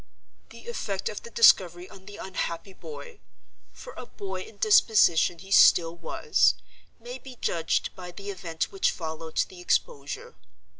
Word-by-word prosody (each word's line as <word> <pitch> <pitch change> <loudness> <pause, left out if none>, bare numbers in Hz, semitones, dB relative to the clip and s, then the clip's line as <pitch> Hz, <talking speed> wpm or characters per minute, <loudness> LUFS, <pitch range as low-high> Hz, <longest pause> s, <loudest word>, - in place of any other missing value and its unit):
"The - - -14
effect 195 - -3
of 210 - -7
the - - -11
discovery 180 -6 +4
on 190 0 -15
the 205 0 -10
unhappy 190 -1 -5
boy—for 470 - -13
a - - -9
boy 400 -2 -6
in 445 - -12
disposition 215 - +4
he 190 +3 -13
still 170 -3 +6
was—may 235 +8 -2
be 260 -1 -12
judged 165 -8 -1
by 180 -1 -9
the 200 +3 -7
event 170 -4 -4
which 390 -1 +1
followed 160 -1 -6
the 180 -1 -13
exposure. 180 - -2
190 Hz, 140 wpm, -26 LUFS, 170-250 Hz, -, still